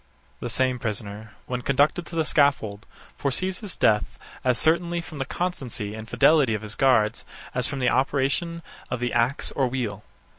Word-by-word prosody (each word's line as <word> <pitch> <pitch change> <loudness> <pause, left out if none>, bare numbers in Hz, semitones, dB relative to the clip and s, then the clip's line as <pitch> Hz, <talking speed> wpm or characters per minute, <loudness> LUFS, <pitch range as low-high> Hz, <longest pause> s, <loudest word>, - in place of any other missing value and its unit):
The 120 - -4
same 130 +1 +1
prisoner, 105 -1 -4
when 125 -1 -3
conducted 145 +7 +2
to 170 - -8
the 160 -1 +1
scaffold, 115 -9 +1 0.3
foresees 185 +7 -1
his 205 -5 -5
death 105 -1 +2 0.3
as 125 -1 +2
certainly 170 +2 +2
from 160 -3 -8
the 135 - -1
constancy 130 - -3
and 110 +1 -8
fidelity 145 -8 +4
of 105 - -5
his 105 0 -5
guards, 115 -5 +3 0.3
as 125 -1 +1
from 140 - -4
the 125 -2 +2
operation 140 +6 0 0.3
of 125 - -2
the 125 0 -1
axe 120 +4 +1
or 135 -2 +1
wheel. 115 -5 -3
130 Hz, 175 wpm, -25 LUFS, 110-150 Hz, 0.3 s, fidelity